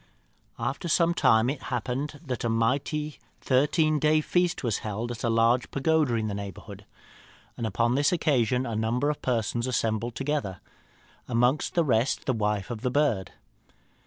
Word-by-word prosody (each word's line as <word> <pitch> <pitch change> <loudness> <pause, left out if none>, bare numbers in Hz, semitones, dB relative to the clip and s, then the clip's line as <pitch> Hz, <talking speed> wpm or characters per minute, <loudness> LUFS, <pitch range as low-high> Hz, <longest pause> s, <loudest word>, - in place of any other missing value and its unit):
"After 135 +9 -3
some 170 +1 +3
time 115 -7 +4
it 135 0 -2
happened 130 +4 -3
that 125 -4 -4
a 120 - 0
mighty 140 +6 -1 0.2
thirteen 150 +3 +2
days' 155 +1 +2
feast 175 -3 +1
was 115 -5 0
held 110 +3 -4
at 115 - -7
a 120 - +1
large 115 +2 +2
pagoda 150 -3 +1
in 110 -1 -1
the 105 - -3
neighbourhood, 100 -2 -8 0.7
and 115 - -3
upon 115 +4 +1
this 140 +2 +2
occasion 130 -7 +1
a 115 - -3
number 120 +6 0
of 150 - -7
persons 120 0 -1
assembled 115 -1 -1
together, 135 - -2 0.7
amongst 125 +4 +1
the 170 - +4
rest 120 -3 +1
the 130 - +1
wife 105 -2 -1
of 115 -2 -5
the 125 - 0
bird. 125 - 0
125 Hz, 160 wpm, -27 LUFS, 115-145 Hz, 0.7 s, time